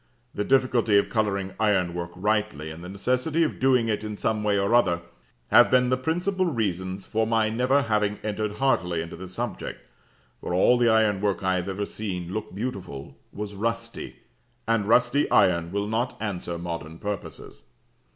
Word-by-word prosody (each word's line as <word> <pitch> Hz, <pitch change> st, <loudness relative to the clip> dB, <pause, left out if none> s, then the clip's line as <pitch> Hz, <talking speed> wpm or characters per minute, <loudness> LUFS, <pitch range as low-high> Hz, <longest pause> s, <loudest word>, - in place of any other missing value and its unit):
The 105 Hz, -, -1 dB
difficulty 125 Hz, -4 st, +3 dB
of 100 Hz, -, +2 dB
colouring 100 Hz, -4 st, -1 dB
ironwork 90 Hz, -5 st, +1 dB
rightly, 105 Hz, -6 st, -1 dB
and 80 Hz, +2 st, -10 dB
the 90 Hz, -, -7 dB
necessity 125 Hz, -, 0 dB
of 155 Hz, -, -2 dB
doing 125 Hz, -3 st, +3 dB
it 105 Hz, -1 st, -1 dB
in 105 Hz, -1 st, -5 dB
some 110 Hz, 0 st, -1 dB
way 105 Hz, -1 st, +2 dB
or 100 Hz, +3 st, +1 dB
other, 90 Hz, -8 st, +3 dB, 0.5 s
have -, -, +7 dB
been 125 Hz, -1 st, +4 dB
the 130 Hz, -, +3 dB
principal 180 Hz, +7 st, 0 dB
reasons 95 Hz, -, -2 dB
for 110 Hz, 0 st, 0 dB
my 110 Hz, -1 st, +2 dB
never 125 Hz, +5 st, +2 dB
having 105 Hz, -2 st, 0 dB
entered 105 Hz, 0 st, -2 dB
heartily 90 Hz, -10 st, +1 dB
into 85 Hz, -, -8 dB
this 95 Hz, +1 st, -9 dB
subject; -, -, -4 dB, 0.6 s
for 90 Hz, -, -2 dB
all 110 Hz, +7 st, +5 dB
the 120 Hz, -1 st, +3 dB
ironwork 105 Hz, -3 st, +2 dB
I 95 Hz, 0 st, +2 dB
have 90 Hz, +2 st, -3 dB
ever 100 Hz, +2 st, -2 dB
seen 90 Hz, -5 st, -5 dB
look 105 Hz, -4 st, -5 dB
beautiful 95 Hz, -, -5 dB, 0.2 s
was 105 Hz, 0 st, -6 dB
rusty, 115 Hz, +3 st, -3 dB, 0.5 s
and 115 Hz, -3 st, +1 dB
rusty 125 Hz, +5 st, +3 dB
iron 85 Hz, -4 st, +3 dB
will 100 Hz, +1 st, -1 dB
not 115 Hz, +4 st, -2 dB
answer 90 Hz, -5 st, -3 dB
modern 85 Hz, -2 st, -6 dB
purposes. 100 Hz, -10 st, -6 dB
105 Hz, 170 wpm, -25 LUFS, 95-115 Hz, 0.6 s, have